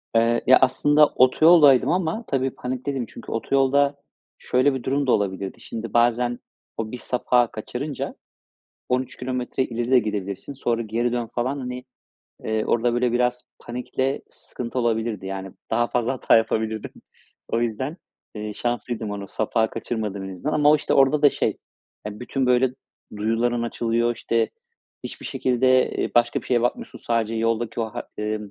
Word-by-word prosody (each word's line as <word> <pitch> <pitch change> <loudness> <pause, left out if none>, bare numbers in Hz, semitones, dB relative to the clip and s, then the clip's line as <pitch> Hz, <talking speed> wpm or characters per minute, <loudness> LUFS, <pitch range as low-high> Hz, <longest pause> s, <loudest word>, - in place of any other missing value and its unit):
Eee, 115 +1 +3
ya, 130 - +8
aslında 145 +3 +5
otoyoldaydım 145 +1 +6
ama 180 +5 0
tabii 135 -1 0
panikteydim 130 +1 -3
çünkü - - -11
otoyolda 140 +4 +2 0.4
şöyle 130 +2 +2
bir 130 - -4
durum 140 +1 0
da - - +4
olabilirdi: 95 -2 -1
Şimdi 115 -2 -6
bazen 120 +1 +2 0.4
o 110 -1 -3
bir 125 - -5
sapağı 125 -1 +1
kaçırınca 125 +6 -5 0.7
13 130 0 -1
kilometre 125 0 -2
ileri 120 +1 -3
de 130 - +7
gidebilirsin. 105 +2 -4
Sonra 120 -3 -1
geri 115 +2 -1
dön 120 -1 -2
falan, 130 +4 -1
hani, 125 0 -6 0.6
eee, 110 0 0
orada 120 +1 +1
böyle 120 0 +1
biraz 125 0 0
panikle 130 +3 -3
sıkıntı 125 +1 -6
olabilirdi. 115 -4 -1
Yani, 95 -1 -5 0.2
daha 120 - +2
fazla 120 +1 0
hata 130 - +3
yapabilirdim. 110 -1 -1 0.6
O 115 - 0
yüzden, 120 +7 -2 0.4
eee, 105 -1 -5
şanslıydım 120 -2 -3
onu 100 -1 -5
sapağı 110 +1 0
kaçırmadım 105 -4 -4
en 95 - -6
azından 115 +12 -3
ama 150 -1 +4
o, 155 - +6
işte, - - -1
orada 135 +2 +4
da 145 - +7
şey, - - -1 0.5
eee, 105 +1 -7
bütün, 130 +1 -1
böyle, 125 0 +3 0.5
duyuların 115 +3 0
açılıyor. 120 0 0
İşte, 115 -1 0 0.5
hiçbir - - -7
şekilde, 130 0 +2
eee, - - -2
başka 120 0 +3
bir - - -14
şeye 120 -2 +2
bakmıyorsun 120 - -2
sadece 115 -1 -1
yoldaki 115 +1 -1
o 115 - +1
ha 120 - -3 0.2
emm, 105 -1 -3
120 Hz, 160 wpm, -23 LUFS, 115-130 Hz, 0.7 s, ya